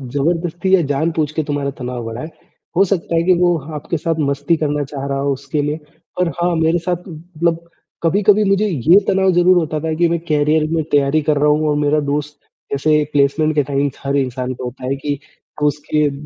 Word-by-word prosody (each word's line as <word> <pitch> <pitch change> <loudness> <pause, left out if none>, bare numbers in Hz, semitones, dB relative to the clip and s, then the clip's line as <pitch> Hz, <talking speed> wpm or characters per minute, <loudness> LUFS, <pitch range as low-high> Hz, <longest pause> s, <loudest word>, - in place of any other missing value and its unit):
ज़बरदस्ती 170 +5 +1
या 180 - +2
जानबूझ 155 +1 0
के 155 0 -1
तुम्हारा 145 -1 -2
तनाव 125 -1 -4
बढ़ाए। 115 +7 -6 0.5
हो 195 - +6
सकता 175 -3 -1
है 165 - +2
कि 185 +2 +4
वो 175 -1 +3 0.2
आपके 150 +3 -3
साथ 165 +1 -1
मस्ती 145 +4 +1
करना 150 -1 -1
चाह 135 0 -6
रहा 140 0 -1
हो 140 0 0
उसके 140 +3 -3
लिए। 150 +2 -2 0.4
और 180 - +2
हाँ, 175 -1 +2
मेरे 160 +1 +2
साथ 175 +1 -3
मतलब 170 0 -3 0.4
कभी-कभी 205 +4 +4
मुझे 195 +2 +2
ये 170 - +4
तनाव 190 -1 +3
ज़रूर 180 +1 +5
होता 155 -2 0
था 160 +1 -2
कि 170 +2 +3
मैं 170 0 0
करियर 150 +1 +2
में 165 -1 0
तैयारी 145 +1 +3
कर 150 - +3
रहा 150 +1 +3
हूँ 155 +1 +2
और 145 - +1
मेरा 150 +1 +2
दोस्त 150 0 -3 0.3
जैसे 150 +2 +2
प्लेसमेंट 145 +2 +2
के 145 - +3
टाइम 140 +1 0 0.2
हर 140 - 0
इंसान 130 -1 -2
को 125 - -9
होता 125 +1 -7
है 135 - 0
कि 145 +1 -3 0.5
उसके 150 +1 +1
अ, 145 - -1
155 Hz, 205 wpm, -18 LUFS, 140-170 Hz, 0.5 s, हो